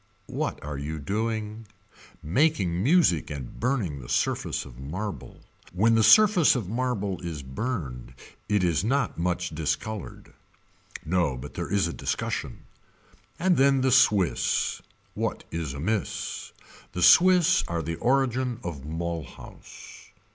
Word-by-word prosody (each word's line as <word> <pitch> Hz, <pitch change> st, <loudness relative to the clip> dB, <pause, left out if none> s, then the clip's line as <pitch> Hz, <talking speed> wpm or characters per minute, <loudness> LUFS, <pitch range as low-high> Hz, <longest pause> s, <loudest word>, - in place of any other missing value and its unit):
What -, -, -2 dB
are 75 Hz, -2 st, -5 dB
you 75 Hz, +3 st, -4 dB
doing. 110 Hz, +6 st, -3 dB, 0.6 s
Making 95 Hz, -, +1 dB
music 135 Hz, -, +3 dB
and 70 Hz, -5 st, -7 dB
burning 115 Hz, -, -1 dB
the -, -, -11 dB
surface -, -, -1 dB
of 65 Hz, -2 st, -13 dB
marble. 95 Hz, +10 st, -6 dB, 0.3 s
When 110 Hz, +5 st, +3 dB
the 115 Hz, -, +4 dB
surface 180 Hz, -, +6 dB
of 115 Hz, -8 st, -3 dB
marble 110 Hz, -4 st, -2 dB
is 80 Hz, -5 st, -5 dB
burned 65 Hz, -, -5 dB, 0.3 s
it 105 Hz, -3 st, +2 dB
is 85 Hz, -1 st, +1 dB
not 135 Hz, -4 st, 0 dB
much 90 Hz, 0 st, -1 dB
discolored. 80 Hz, +7 st, -4 dB, 0.7 s
No 85 Hz, -6 st, 0 dB
but 60 Hz, -, -9 dB
there -, -, -5 dB
is 100 Hz, -4 st, +2 dB
a 85 Hz, -, -4 dB
discussion. -, -, -3 dB, 0.7 s
And 180 Hz, 0 st, +2 dB
then 135 Hz, 0 st, +4 dB
the 130 Hz, 0 st, +2 dB
Swiss. 105 Hz, -8 st, +2 dB, 0.3 s
What -, -, -3 dB
is 80 Hz, -5 st, -4 dB
amiss. 100 Hz, +8 st, -3 dB, 0.4 s
The 90 Hz, -, -1 dB
Swiss 180 Hz, -, +6 dB
are 85 Hz, -1 st, -2 dB
the 80 Hz, +1 st, -4 dB
origin 130 Hz, -1 st, +1 dB
of 75 Hz, -6 st, -6 dB
Mulhouse. 80 Hz, 0 st, -8 dB
95 Hz, 130 wpm, -26 LUFS, 80-125 Hz, 0.7 s, surface